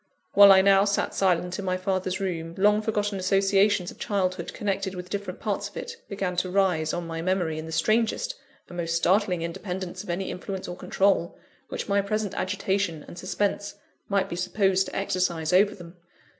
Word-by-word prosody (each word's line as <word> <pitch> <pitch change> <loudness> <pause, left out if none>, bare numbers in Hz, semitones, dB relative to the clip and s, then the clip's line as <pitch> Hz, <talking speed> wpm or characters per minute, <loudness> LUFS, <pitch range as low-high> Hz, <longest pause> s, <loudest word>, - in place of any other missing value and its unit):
While 200 0 +9
I 190 -1 +7
now 195 0 +6
sat 200 -1 0
silent 180 0 +1
in 200 - -4
my 185 0 0
father's 185 0 -1
room, 170 -3 -3
long 210 +2 +4
forgotten 210 -2 -1
associations 195 0 +2
of - - -16
childhood 185 -2 -1
connected 195 -2 -2
with 180 0 -8
different 200 0 -4
parts - - -2
of - - -13
it, 470 -1 -6
began 195 -3 -2
to 180 +1 0
rise 180 -5 +2
on 175 0 -3
my 165 0 -4
memory 175 -3 0
in 160 - -7
the - - -7
strangest 225 - +1 0.3
and 175 - -10
most 165 -1 -1
startling 180 +1 +2
independence 180 +1 -5
of 205 - -12
any 180 +2 -2
influence 190 +1 -5
or 175 - -5
control, 185 -1 +1 0.3
which - - -4
my 200 -1 +2
present 210 0 -2
agitation 190 -4 -1
and 175 - -10
suspense 205 +2 -2 0.3
might 195 -1 +1
be 170 - -5
supposed 190 +1 +1
to - - -8
exercise 180 -4 0
over 200 +3 +4
them. 175 -2 -12
190 Hz, 185 wpm, -26 LUFS, 180-200 Hz, 0.3 s, While